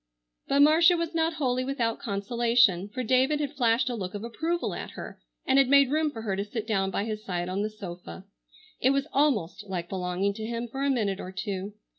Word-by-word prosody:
But 280 +1 +3
Marcia 325 +4 +6
was 335 0 -3
not 325 0 +1
wholly 255 -4 0
without 250 -4 -1
consolation, 225 -2 +2
for 255 +5 -4
David 260 +5 +2
had 290 -1 -2
flashed 240 -2 +2
a 250 - -1
look 195 -4 -5
of 205 - -5
approval 325 +9 -2
at - - -6
her - - -9 0.2
and 265 +1 +4
had 270 - +5
made 280 -1 +5
room 310 0 +2
for 225 -6 -8
her 200 -3 -1
to 200 - -2
sit 215 +1 -5
down 195 -4 0
by 195 - -1
his 215 -1 -4
side 175 -3 -3
on 185 +2 -2
the 215 - -1
sofa. 185 -2 -9 0.5
It 260 - +3
was 275 0 +1
almost 215 - +1
like 175 -3 -4
belonging 185 +1 -1
to 220 - -7
him 235 +1 -3
for 270 +4 -4
a 280 - +2
minute 210 -7 0
or 185 - -6
two. 195 +1 -4
230 Hz, 220 wpm, -27 LUFS, 200-275 Hz, 0.5 s, Marcia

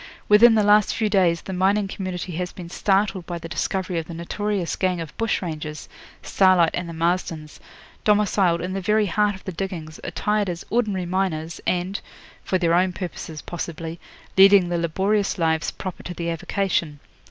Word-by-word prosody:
Within 225 +2 +7
the 215 - +3
last 210 0 +4
few 220 -2 0
days 180 -5 +2
the 190 - -6
mining 195 +2 +2
community 185 -2 -5
has 180 +2 -3
been 175 -2 -10
startled 195 -2 +1
by 175 - -4
the 165 - -8
discovery 180 +3 -2
of 160 - -6
the 170 - -7
notorious 195 +2 -2
gang 185 -2 0
of 160 -4 -7
bush 225 -3 -1
rangers, 155 -3 -5 0.4
Starlight 185 -4 +4
and 175 -1 -3
the - - -6
Marstons, 165 -2 -2 0.4
domiciled 200 -5 +3
in 180 +2 -3
the 195 - -2
very 210 +3 +2
heart 205 +2 +1
of 190 - -14
the 190 - -5
diggings, 165 -4 -5
attired 210 +3 -1
as 175 0 -5
ordinary 210 -6 0
miners, 170 -3 -2
and 180 +2 -1 0.4
for 185 - 0
their 170 -2 +1
own 180 +1 +3
purposes 165 -3 -6
possibly 165 -1 -6 0.4
leading 195 -2 +7
the 175 -1 0
laborious 195 +5 0
lives 160 -2 +1
proper 185 -2 -7
to 180 - -7
the 170 0 -2
avocation. 165 -3 -1
180 Hz, 175 wpm, -23 LUFS, 170-195 Hz, 0.4 s, Within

